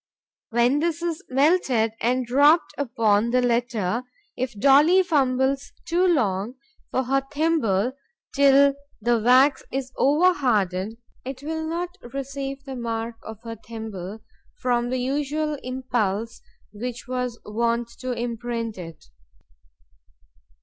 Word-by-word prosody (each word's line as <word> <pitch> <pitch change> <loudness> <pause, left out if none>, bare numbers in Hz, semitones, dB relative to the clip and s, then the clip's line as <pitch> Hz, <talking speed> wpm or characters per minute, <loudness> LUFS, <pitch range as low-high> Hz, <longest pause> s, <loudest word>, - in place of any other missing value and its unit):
When 240 +4 +3
this 335 +1 -1
is 335 -2 -2
melted 265 -5 +2
and 250 +2 +1
dropped 290 +7 +4
upon 230 -5 +1
the 250 +1 +3
letter, 235 -3 0 0.3
if 245 -4 -4
Dolly 295 - +6
fumbles 270 -4 +1
too 355 +2 +2
long 220 - +1 0.3
for 260 - 0
her 270 +2 +1
thimble, 275 -8 +1 0.4
till 280 -1 +5 0.3
the 235 +1 +2
wax 255 +5 +5
is 265 0 -3
over 315 +7 +4
hardened, 210 - 0 0.3
it 265 +1 -7
will 320 +1 -3
not 350 +3 -4 0.2
receive 275 0 -5
the 270 -2 -7
mark 230 -1 -4
of 220 +1 -10
her 230 -1 -7
thimble 220 -2 -7 0.4
from 245 -1 0
the 255 - -1
usual 290 +4 -1
impulse 240 -4 -2 0.3
which 245 +4 -6
was 250 -2 -3
wont 235 +2 0
to 255 -1 -3
imprint 235 -2 -3
it. 165 -3 -10
250 Hz, 120 wpm, -24 LUFS, 230-280 Hz, 0.4 s, Dolly